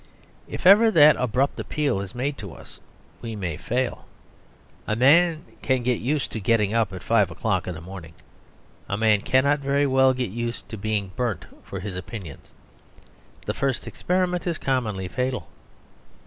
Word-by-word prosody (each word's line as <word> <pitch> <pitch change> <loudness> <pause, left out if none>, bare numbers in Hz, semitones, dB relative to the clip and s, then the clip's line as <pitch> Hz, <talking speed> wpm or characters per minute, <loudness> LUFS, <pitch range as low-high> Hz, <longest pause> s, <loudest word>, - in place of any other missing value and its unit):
If - - -7
ever 210 +5 +8
that 150 -7 +7
abrupt 125 +3 0
appeal 140 -10 -1
is 100 +3 -8
made 135 +4 -2
to 100 -5 -8
us - - -14 0.4
we 115 -2 -5
may 90 -6 -3
fail. 125 +10 -3 0.8
A 110 - 0
man 155 +7 +4 0.2
can 130 -2 0
get 125 -1 +1
use 140 +4 -1
to 110 - -5
getting 105 0 +1
up 115 -3 +1
at 95 -1 -8
five 105 -5 +3
o'clock 95 +2 -2
in 90 - -4
the 80 - -9
morning. 85 -2 -10 0.8
A 100 - -1
man 110 -2 +3
cannot 140 +4 +2
very 140 +1 +1
well 130 -1 +4
get 125 -6 -2
used 120 +2 -4
to - - -5
being 105 -2 -2
burnt 120 -8 -2 0.2
for 95 - -7
his 100 -1 -5
opinions; 90 - -8 0.9
the - - -1
first 135 -2 -1
experiment 180 0 -1
is 170 -2 -1
commonly 110 -8 -1
fatal. 125 - -3
120 Hz, 165 wpm, -24 LUFS, 100-140 Hz, 0.9 s, ever